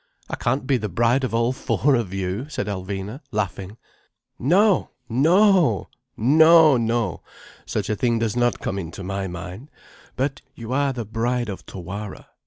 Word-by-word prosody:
"I - - -1
can't 130 +2 -1
be 135 -1 +2
the 105 -3 -4
bride 120 +8 +2
of 130 - -1
all 115 +2 +1
four 140 +2 +1
of 115 -7 0
you," 95 +8 -3
said 125 - -3
Alvina, 100 - -5
laughing. 105 -1 -3 0.6
"No—no! 170 - +3 0.3
No—no! 130 - +4 0.4
Such - - -2
a 110 - 0
thing 120 +1 +1
does 115 -1 -1
not 120 -1 +1
come 100 - -3
into 85 +1 -7
my 95 +1 -3
mind. 90 - -8 0.5
But 135 +1 -2
you 115 +1 -6
are 140 0 +2
the 120 -3 -5
Bride 120 +2 -1
of 95 - -7
Tawara. 100 +2 -7
115 Hz, 150 wpm, -23 LUFS, 100-135 Hz, 0.6 s, No—no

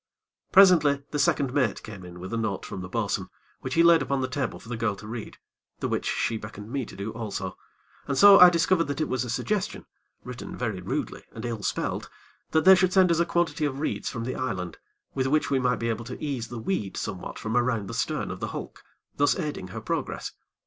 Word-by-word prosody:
Presently, 160 -8 +6
the 150 - -1
second 140 -2 +2
mate 130 -8 +1
came 100 -4 -9
in 90 0 -10
with 95 +4 -7
a - - 0
note 110 -4 -2
from 95 - -6
the 90 - -7
bo'sun, - - -2 0.3
which - - -4
he 165 - +5
laid 170 -1 +6
upon 140 -1 0
the 130 - 0
table 130 -1 -3
for - - -15
the 120 - -3
girl 115 -3 0
to 95 - -12
read, 115 0 -7 0.4
the - - -1
which - - -1
she 115 - 0
beckoned 105 0 -9
me 135 -3 -2
to - - -11
do 100 +3 -4
also, 100 -5 -5 0.5
and 140 - -1
so 200 -1 +9
I 180 - +11
discovered 170 0 +2
that 145 +1 -4
it 155 - 0
was 130 0 -1
a 125 - -6
suggestion, 205 - -2 0.4
written 125 -1 -7
very 110 -7 -2
rudely - - -4
and 115 +1 -7
ill 115 -3 -3
spelt, - - -2 0.4
that 160 +1 +2
they 190 - +10
should 185 -1 +3
send 185 -2 +5
us 165 - +2
a 170 - +2
quantity 170 -2 0
of 140 -2 -1
reeds 155 - -2
from 115 -2 -5
the 130 - -3
island, 90 -9 -4 0.3
with 130 -1 0
which 150 +2 +1
we 135 - +3
might 125 -1 +2
be 115 +1 -2
able 115 +1 -3
to 125 - -7
ease 135 -6 -3
the 120 - -7
weed 110 - -2
somewhat 95 -3 -5
from 110 +1 -3
around 120 -4 +1
the - - -6
stern - - -1
of - - -6
the - - -3
hulk, - - -7 0.3
thus 145 0 +3
aiding 150 - -4
her 90 - -7
progress. - - -3
125 Hz, 230 wpm, -26 LUFS, 110-150 Hz, 0.5 s, I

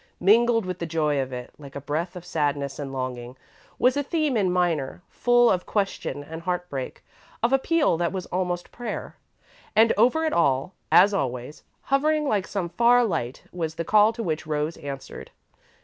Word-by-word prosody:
Mingled 230 +3 +4
with 185 -1 -4
the 170 - -3
joy 155 -3 0
of 130 0 -5
it, 125 -1 -7
like 140 -2 -12
a - - -3
breath 155 +6 -3
of 175 -1 -9
sadness 145 -4 -2
and 140 -2 -5
longing, 130 -1 -5 0.4
was 250 +2 +3
a 285 - +1
theme 300 -2 0
in 200 -4 +2
minor, 175 -3 0
full 240 -1 +4
of 180 -1 -1
question 195 -7 -2
and 160 +3 -8
heartbreak; 175 -6 -4 0.4
of 240 +3 +3
appeal 290 - +2
that 170 -1 0
was 185 -1 -4
almost 180 -1 -3
prayer. 240 -1 -6 0.6
And 225 +1 +5
over 255 +9 +3
it 315 - 0
all, 140 +2 +1 0.2
as 200 +3 +6
always, 130 -3 -3 0.2
hovering 300 +2 +1
like 205 -6 0
some 185 -4 -3
far 240 +7 +4
light, 130 - -3
was 160 -3 -4
the 165 0 -3
call 215 +3 +5
to 230 0 -5
which 160 -4 -3
Rose 150 +1 -1
answered. 140 -3 -8
175 Hz, 180 wpm, -25 LUFS, 145-225 Hz, 0.6 s, as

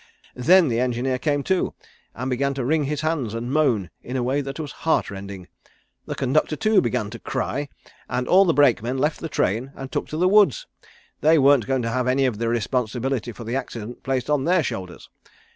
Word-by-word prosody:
Then 170 +7 +5
the 115 -2 0
engineer 125 +1 0
came 145 +1 0
to, 190 +3 0 0.4
and 130 +2 -4
began 140 +2 0
to 130 -3 -2
wring 150 +2 +1
his 150 +1 -2
hands 150 -9 -1
and 120 +2 -4
moan 125 - +1
in 125 +2 -5
a 125 - 0
way 135 +4 0
that 135 +2 -6
was 150 -3 -5
heart 160 - 0
rending. 100 -2 -8 0.6
The - - -4
conductor, 145 +3 +1
too, 215 +2 +3
began 110 -3 -2
to 115 - -8
cry, 140 +2 -3 0.4
and 125 0 -2
all 195 +2 +6
the 170 - +3
brakemen 130 -3 +3
left 150 +3 0
the 165 - -5
train 120 +3 -1
and 135 -1 -8
took - - -2
to 155 - -5
the 180 +3 +3
woods. 210 - +4 0.5
They 160 +2 +4
weren't 140 -4 +4
going 135 -2 0
to 115 - -2
have 125 +1 -1
any 135 +1 +2
of 115 -5 -1
the 115 0 0
responsibility 120 +1 -1
for 115 - -10
the 115 +3 -3
accident 120 -3 -5
placed 130 -2 -2
on 150 -2 +1
their 180 0 +3
shoulders. 95 -8 -6
130 Hz, 210 wpm, -23 LUFS, 120-150 Hz, 0.6 s, all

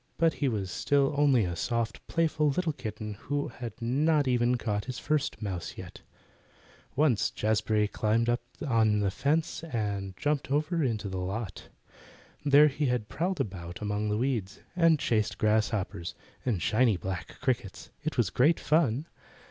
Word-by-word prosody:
But 165 -1 +3
he 140 - +3
was 100 -6 -2
still 140 0 +2
only 140 -7 +4
a 85 -1 -3
soft, 115 +4 -2
playful 155 -2 +1
little 160 +2 0
kitten, 110 -5 -5
who 145 0 -1
had 120 -3 -8
not 145 +5 +2
even 125 0 +2
caught 105 -3 -2
his 130 0 -5
first 150 -1 -1
mouse 95 -4 -4
as - - -23
yet. - - -9 0.9
Once 135 -7 +3
Jazbury 110 0 +1
had 105 - 0
climbed 110 +2 +1
up 120 0 +1 0.3
on 110 -4 +3
the 100 -2 +1
fence, 155 - 0
and 100 - -3
jumped 145 -2 -1
over 155 +4 +1
into 110 -5 -1
the 95 -1 -3
lot. 95 +2 -5 0.7
There 145 +1 +7
he 145 0 -1
had 120 -4 -1
prowled 180 +2 -1
about 90 -8 -4
among 105 0 -1
the 105 - 0
weeds, 115 -6 -2
and 165 -2 +5
chased 110 -6 0
grasshoppers, 105 -5 0 0.3
and 105 -9 -1
shiny 110 -3 +3
black 95 +1 -6
crickets. 125 -7 -2
It 155 -1 -3
was 115 -6 +2
great 150 +6 +3
fun. 150 -3 +2
120 Hz, 165 wpm, -29 LUFS, 105-145 Hz, 0.9 s, There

